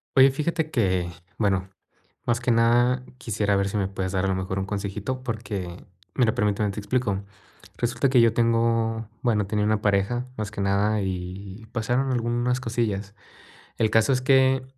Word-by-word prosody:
Oye, 135 0 +8
fíjate 155 +3 -1
que, 95 - +1 0.3
bueno, 95 -3 0 0.5
más 120 0 +1
que 125 - -2
nada, 120 +2 +3
quisiera 105 -3 0
ver 100 0 +1
si 105 - -2
me 100 -2 0
puedes 95 -1 -3
dar 95 0 +1
a - - +1
lo 95 - +1
mejor, 95 +1 -3
un 95 - -1
consejito, 100 +5 -4
porque 105 -7 -5 0.3
mira, 115 -4 +3
permíteme, 105 0 +1
te 100 - -5
explico. 100 -3 -1 0.5
Resulta 120 +3 +1
que 125 -1 +5
yo 115 -1 +4
tengo 115 -1 +1
bueno, 110 -5 +1
tenía 105 +1 0
una 110 0 +1
pareja, 105 +5 +1
más 110 -2 -3
que 100 -1 -5
nada, 100 +1 +1
y 95 +3 -6
pasaron 125 +3 0
algunas 120 +1 0
cosillas. 110 -5 -2 0.7
El 110 -1 +2
caso, 110 +4 +4
es 130 - +2
que 130 0 +4
110 Hz, 170 wpm, -25 LUFS, 100-120 Hz, 0.7 s, Oye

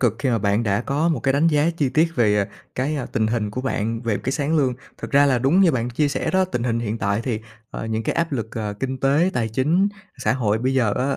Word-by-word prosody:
cực 115 -4 +2
khi 135 - -1
mà 115 - +2
bạn 105 +2 +1
đã 100 -1 +1
có 145 +6 0
một 150 -8 0
cái 135 - +1
đánh 145 +4 +3
giá 155 +1 +3
chi 145 -5 +1
tiết 160 +5 +2
về 105 -4 +3 0.3
cái, 145 +4 -1
à, 135 - -3
tình 110 - +1
hình 110 -2 -1
của 125 - -4
bạn 115 -3 -2
về 110 -3 0
cái 130 - -3
sáng 150 +3 0
lương. 130 -4 +2 0.2
Thực - - -7
ra 140 +1 +5
là 130 -3 +3
đúng 135 +10 +3
như 185 -4 +5
bạn 120 -1 -1
chia 145 +4 +1
sẻ 140 - -2
đó, 190 0 +3
tình 175 -10 -3
hình 115 -1 0
hiện 110 0 -3
tại 100 +2 0
thì, 115 -4 -2 0.3
ờ, - - -5
những 110 0 -2
cái - - -1
áp 170 -1 -1
lực, 115 -4 -3
ờ, 105 -2 -3
kinh 130 0 -2
tế, 145 +7 +3
tài 115 -2 0
chính, 155 - +2 0.3
xã - - +1
hội 110 -5 0
bây 130 +3 0
giờ 115 -6 +2
á, 135 +2 0
130 Hz, 280 wpm, -22 LUFS, 110-145 Hz, 0.3 s, ra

